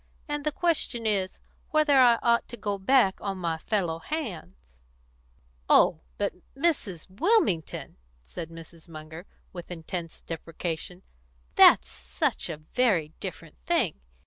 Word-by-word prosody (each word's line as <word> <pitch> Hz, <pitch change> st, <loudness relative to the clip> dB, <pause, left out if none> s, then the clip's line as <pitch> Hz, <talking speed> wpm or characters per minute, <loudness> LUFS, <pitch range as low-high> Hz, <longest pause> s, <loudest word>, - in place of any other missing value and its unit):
And 295 Hz, -1 st, -3 dB
the 300 Hz, -, 0 dB
question 300 Hz, -9 st, 0 dB
is, 195 Hz, -3 st, 0 dB, 0.3 s
whether 305 Hz, -3 st, +4 dB
I 240 Hz, -2 st, +7 dB
ought 235 Hz, 0 st, +3 dB
to 240 Hz, -, -8 dB
go 200 Hz, -3 st, -3 dB
back 195 Hz, -2 st, +3 dB
on 195 Hz, -2 st, -3 dB
my 165 Hz, -3 st, -2 dB
fellow 175 Hz, -4 st, -1 dB
hands." 160 Hz, -, -6 dB, 0.9 s
"Oh, -, -, +5 dB, 0.2 s
but -, -, -1 dB, 0.2 s
Mrs. 270 Hz, -, -1 dB
Wilmington!" 200 Hz, -, 0 dB, 0.3 s
said 160 Hz, -, -7 dB
Mrs. 165 Hz, 0 st, -13 dB
Munger, 160 Hz, +3 st, -10 dB, 0.3 s
with 175 Hz, -2 st, -8 dB
intense 170 Hz, 0 st, -6 dB
deprecation, 165 Hz, +2 st, -5 dB, 0.5 s
"that's -, -, +7 dB
such -, -, -2 dB
a 160 Hz, -, -4 dB
very 170 Hz, 0 st, +1 dB
different -, -, -8 dB
thing. -, -, +1 dB
185 Hz, 125 wpm, -27 LUFS, 165-245 Hz, 0.9 s, I